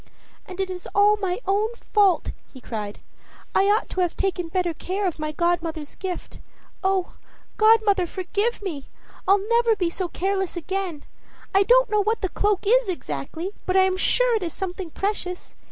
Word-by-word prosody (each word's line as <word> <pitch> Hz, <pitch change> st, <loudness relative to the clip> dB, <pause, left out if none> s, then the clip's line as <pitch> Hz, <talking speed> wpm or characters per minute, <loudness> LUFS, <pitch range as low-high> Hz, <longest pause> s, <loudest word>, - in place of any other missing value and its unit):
"And 370 Hz, 0 st, -9 dB
it 380 Hz, -1 st, -1 dB
is 360 Hz, -1 st, -7 dB
all 410 Hz, +1 st, +5 dB
my 380 Hz, -2 st, -2 dB
own 420 Hz, +4 st, +1 dB
fault!" 405 Hz, -5 st, +2 dB, 0.2 s
he 260 Hz, -, -12 dB
cried. 210 Hz, -4 st, -6 dB, 0.5 s
"I 385 Hz, -, +4 dB
ought 420 Hz, +3 st, +2 dB
to 375 Hz, -, -1 dB
have 350 Hz, -2 st, 0 dB
taken 370 Hz, -3 st, -1 dB
better 355 Hz, 0 st, 0 dB
care 380 Hz, +5 st, -3 dB
of 350 Hz, -4 st, -2 dB
my 305 Hz, 0 st, -2 dB
godmother's 330 Hz, -2 st, -1 dB
gift. 370 Hz, -2 st, -6 dB, 0.4 s
Oh, 380 Hz, -1 st, +1 dB, 0.4 s
godmother, 430 Hz, -4 st, +4 dB
forgive 405 Hz, +6 st, -2 dB
me! 305 Hz, -8 st, -5 dB, 0.4 s
I'll 395 Hz, +1 st, +3 dB
never 470 Hz, -1 st, +3 dB
be 355 Hz, -4 st, 0 dB
so 370 Hz, +1 st, -2 dB
careless 385 Hz, 0 st, -2 dB
again. 360 Hz, -3 st, -3 dB, 0.5 s
I 390 Hz, -, +5 dB
don't -, -, +5 dB
know 425 Hz, -1 st, +3 dB
what 440 Hz, +3 st, 0 dB
the 380 Hz, -, -1 dB
cloak 410 Hz, +1 st, 0 dB
is 485 Hz, +1 st, +4 dB
exactly, 320 Hz, -, -4 dB, 0.2 s
but 370 Hz, +1 st, +2 dB
I -, -, +7 dB
am 375 Hz, 0 st, +2 dB
sure -, -, +3 dB
it -, -, -5 dB
is 340 Hz, -3 st, -3 dB
something 375 Hz, -2 st, -5 dB
precious. 365 Hz, 0 st, -4 dB
380 Hz, 175 wpm, -24 LUFS, 350-410 Hz, 0.5 s, I